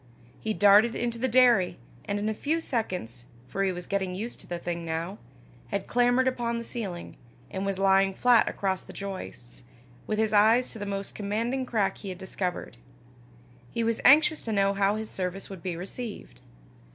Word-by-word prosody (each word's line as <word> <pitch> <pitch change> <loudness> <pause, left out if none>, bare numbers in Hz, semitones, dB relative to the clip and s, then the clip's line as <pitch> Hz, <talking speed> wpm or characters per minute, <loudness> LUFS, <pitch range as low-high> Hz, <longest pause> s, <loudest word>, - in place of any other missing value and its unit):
He 220 -1 -2
darted 205 +3 +6
into 235 -1 -2
the 260 - +1
dairy, 240 -6 +4 0.3
and 200 - -1
in 205 +1 -2
a 220 - 0
few 305 +9 -1
seconds, 180 - -3 0.2
for 195 - -3
he 195 -1 +2
was 180 -1 -5
getting 190 -2 -2
used 225 +5 -5
to - - -15
the 175 - -3
thing 170 0 -4
now, 165 +5 -4 0.5
had 200 -1 -3
clambered 245 +1 +3
upon 240 -2 -1
the 235 - -4
ceiling, 200 -8 -6 0.3
and 190 +1 -3
was 195 -1 -1
lying 195 0 +4
flat 240 +4 +4
across 190 -2 -1
the - - -13
joists, 185 -12 -7 0.5
with 215 - -1
his 220 -1 +1
eyes 220 +4 +5
to 225 - -8
the 205 - -4
most 195 0 -4
commanding 230 +6 -2
crack 210 -5 0
he 200 - -7
had 185 - -6
discovered: 180 -7 -4 0.9
he 230 - -2
was 230 0 0
anxious 310 +3 +6
to 225 - -2
know 200 -1 +2
how 200 +1 +2
his 220 0 -4
service 185 +1 -4
would 190 -3 -8
be 180 -1 -3
received. 190 - -7
200 Hz, 190 wpm, -27 LUFS, 190-235 Hz, 0.9 s, darted